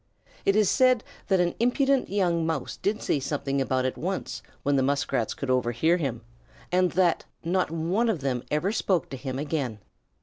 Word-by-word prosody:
It 195 - +4
is 215 -2 +4
said 255 +2 +4 0.2
that 190 -2 +3
an 175 -1 +2
impudent 270 +3 +2
young 175 -4 +1
Mouse 160 -4 -2
did 210 +2 -2
say 145 - +1
something 140 0 -1
about 130 -1 0
it 130 - -2
once 185 +3 -3 0.2
when 145 0 +2
the 135 - +3
Muskrats 135 -4 0
could 135 -2 -2
overhear 125 +7 +2
him 125 -8 -3 0.5
and 180 0 +3
that 175 -2 +2 0.2
not 180 +2 +1
one 170 +9 0
of 185 -10 -1
them 130 -3 -1
ever 150 +7 +1
spoke 190 -5 0
to - - -5
him 130 0 -5
again. 140 -6 -2
165 Hz, 180 wpm, -27 LUFS, 135-190 Hz, 0.5 s, It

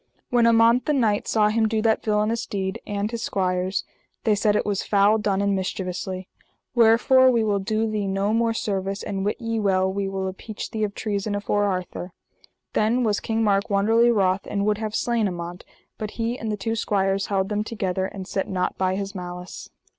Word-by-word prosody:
When 240 -1 +4
Amant, 230 +2 +4
the 300 - +3
knight, 220 -7 +1
saw 210 -1 +3
him 220 +1 +2
do 220 0 0
that 220 -1 +2
villainous 215 +2 0
deed, 190 -1 -3
and 205 +1 -2
his 235 -1 -4
squires, 185 0 -1 0.4
they 220 - +3
said 210 0 +2
it - - +1
was 200 -2 0
foul 205 +2 +3
done, 200 -2 0
and 200 -1 +2
mischievously: 185 0 -4 0.5
Wherefore 240 +3 +5
we 235 -3 +2
will 205 -2 +1
do 215 +3 0
thee 210 -2 -2
no 195 +2 0
more 230 0 +2
service, 195 -2 -2
and 195 -1 -3
wit 205 +5 -1
ye 230 -2 -2
well, 190 -2 +2
we 195 0 -2
will 190 0 -3
appeach 200 +3 -7
thee 220 -1 -2
of 205 -1 -2
treason 205 -1 -2
afore 205 0 0
Arthur. 185 -2 -3 0.6
Then 230 +4 +2
was 210 -3 +1
King 225 -1 -1
Mark 200 0 +2
wonderly 225 +4 +4
wroth 195 -4 +1
and 200 0 -1
would 210 0 +1
have 215 -1 -3
slain 235 -3 +1
Amant; 175 -1 -6 0.4
but 215 - -3
he 230 +1 -1
and 225 -3 -4
the 210 - -2
two 225 +3 -2
squires 195 -2 0
held 195 -1 0
them 210 0 0
together, 190 -4 -2
and 190 -1 -8
set 195 - -2
nought 180 -1 -2
by 185 0 +1
his 195 0 -4
malice. 180 -1 -7
205 Hz, 200 wpm, -24 LUFS, 195-220 Hz, 0.6 s, Wherefore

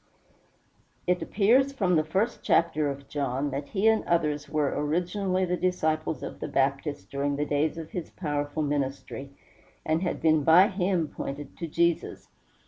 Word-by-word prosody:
It 180 0 +1
appears 250 +7 +3
from 190 -9 +1
the 155 - +3
first 195 +9 -1
chapter 155 -3 +2
of 140 0 -7
John, 140 0 -2
that 140 +2 -4
he 205 +1 +1
and 220 -1 +4
others 150 -4 0
were 150 -2 0
originally 180 +5 0
the 180 0 0
disciples 160 -4 -1
of - - -7
the - - -4
Baptist 135 - -1
during 140 +1 -1
the 145 +1 -1
days 150 +2 0
of 160 -1 -7
his 175 - -4
first - - -24
powerful 145 -2 -2
ministry, 140 -1 -3 0.6
and 160 +1 +1
had 180 - -2
been 155 -2 +3
by 175 +7 +7
him 185 -4 0
pointed 140 0 -6
to 170 - -3
Jesus. 170 +2 0
155 Hz, 165 wpm, -27 LUFS, 145-180 Hz, 0.6 s, by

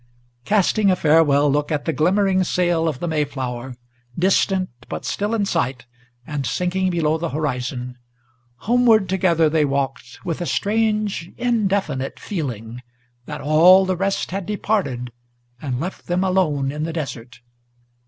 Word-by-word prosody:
Casting 205 0 +2
a 185 - +4
farewell 150 -3 +4
look 145 +2 0
at 145 -2 -1
the 160 - 0
glimmering 190 +4 +2
sail 175 -2 +1
of 155 -5 -1
the 175 - -4
Mayflower, 130 -5 -3 0.4
Distant, 185 0 +2 0.2
but - - -5
still 210 +3 -1
in 210 -3 0
sight, 130 -10 -1 0.4
and 145 -3 -3
sinking 180 +6 0
below 160 -3 0
the 170 0 -2
horizon, 125 -3 -3 0.7
Homeward 230 -3 +4
together 175 -4 +2
they 155 0 +2
walked, 140 +4 -3
with 170 0 -3
a 175 - -2
strange, 210 -4 0
indefinite 195 - -1
feeling, 125 - -5 0.5
That - - -6
all 175 +6 +6
the 185 0 0
rest 195 +1 -1
had 190 -1 -4
departed 195 - -1 0.5
and 130 -4 -3
left 180 +6 -6
them 180 +2 0
alone 155 -8 +1
in 150 +1 -5
the 160 +1 -3
desert. 130 -7 -6
165 Hz, 145 wpm, -21 LUFS, 140-190 Hz, 0.7 s, all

